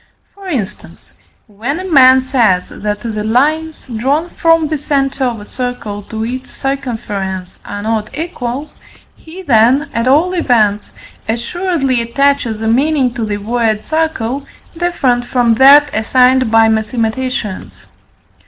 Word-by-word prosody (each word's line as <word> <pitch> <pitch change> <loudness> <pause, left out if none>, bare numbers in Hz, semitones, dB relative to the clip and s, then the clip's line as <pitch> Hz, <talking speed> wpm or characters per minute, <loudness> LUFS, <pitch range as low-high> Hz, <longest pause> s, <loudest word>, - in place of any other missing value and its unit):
For 395 -1 -12
instance, 235 - -6 0.3
when 230 - -4
a 375 - -6
man 260 -6 +6
says 230 -9 +1
that 210 0 -4
the 215 -2 -4
lines 305 +8 0
drawn 275 +8 -1
from 330 -1 +2
the 305 0 -2
centre 275 -2 -1
of 240 -3 -2
a 205 - -10
circle 245 -4 -5
to 220 +2 -5
its 255 +2 -5
circumference 210 -9 -4
are 205 0 -6
not 220 -1 -1
equal, 290 -3 -4 0.4
he 350 +4 -12
then, 265 +2 +3
at 230 +2 -1
all 315 +8 +3
events, 220 - +1 0.4
assuredly 270 +2 -1
attaches 235 -2 0
a 220 - -2
meaning 265 +1 +2
to 235 - -4
the 210 -1 -2
word 220 0 -1
circle 285 -5 -2 0.3
different 305 -8 0
from 240 -1 +1
that 280 +4 +6
assigned 255 +2 +3
by 225 0 +5
mathematicians. 220 0 -2
250 Hz, 135 wpm, -14 LUFS, 220-285 Hz, 0.4 s, man